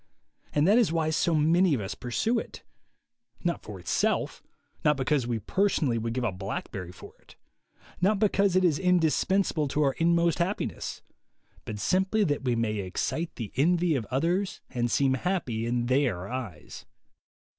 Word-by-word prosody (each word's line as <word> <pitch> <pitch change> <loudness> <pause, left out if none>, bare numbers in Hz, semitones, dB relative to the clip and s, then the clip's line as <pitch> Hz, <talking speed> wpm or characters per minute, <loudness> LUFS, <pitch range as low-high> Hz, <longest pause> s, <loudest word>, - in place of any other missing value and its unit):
And 150 +2 +2
that 215 +5 +6
is 225 -9 +3
why 160 -1 0
so 165 +1 +1
many 165 +2 +3
of - - -2
us 95 -2 -4
pursue 225 - -1
it - - -9 0.4
— 235 -1 -35
not 175 -1 -1
for 105 -3 -9
itself, 90 - -1 0.4
not 150 -1 +3
because 135 -1 0
we 120 -2 -1
personally 145 - 0
would 115 +1 -3
give 130 - -1
a 115 - 0
blackberry 95 -1 -5
for 90 - -13
it, - - -20 0.7
not 200 +3 +3
because 200 -2 +2
it 185 - +4
is 155 -4 +2
indispensable 180 -1 +2
to 150 +2 0
our 135 -2 +2
inmost 170 0 +2
happiness, 185 +4 -3 0.6
but 105 - -5
simply 190 - +1
that 145 -7 0
we 125 -2 +1
may 110 -2 -1
excite 100 - -3
the 115 -4 -6
envy 170 +3 +3
of 115 -6 -3
others 175 +9 0
and 120 -2 -1
seem 135 +2 +2
happy 130 -8 -1
in 120 0 0
their 120 -8 +1
eyes. 115 -11 -7
150 Hz, 165 wpm, -27 LUFS, 120-180 Hz, 0.7 s, that